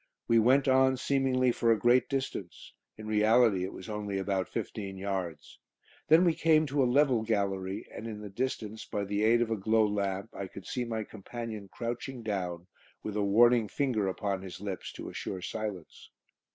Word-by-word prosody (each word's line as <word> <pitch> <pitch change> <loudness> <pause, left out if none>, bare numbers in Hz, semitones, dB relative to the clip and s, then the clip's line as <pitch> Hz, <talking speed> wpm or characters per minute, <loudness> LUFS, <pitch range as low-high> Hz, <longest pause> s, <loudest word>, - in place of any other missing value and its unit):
We 115 0 +5
went 130 +5 +4
on, 130 0 +4
seemingly 130 -2 +2
for 115 -1 +2
a 115 - +4
great 120 +2 +3
distance; 130 -10 -4 0.2
in 110 - -9
reality 110 -2 +4
it 95 - -3
was 95 - -10
only 105 -2 -3
about 95 -1 -1
fifteen 100 -2 -5
yards. 95 -6 -4 0.5
Then 165 +4 +6
we 170 - +4
came 160 -1 +3
to 140 0 0
a 125 - +3
level 130 -3 +3
gallery, 100 -3 -2
and 115 - -6
in 110 -2 -6
the 105 -1 -7
distance, 110 -1 -3
by 100 - -3
the 100 +1 -1
aid 115 +2 +4
of 115 - -5
a - - +2
glow 110 +2 +2
lamp, 100 0 -2
I 100 - -5
could 95 +1 -11
see 125 -1 -3
my 110 -2 -3
companion 110 0 -7
crouching 120 +1 -5
down, 90 -5 -3 0.4
with 105 - -4
a 105 - +1
warning 115 +3 +5
finger 115 -4 0
upon 95 0 -2
his 95 -2 -8
lips 100 -2 -5
to - - -8
assure 95 -2 -5
silence. 105 -6 -6
110 Hz, 185 wpm, -30 LUFS, 100-120 Hz, 0.5 s, Then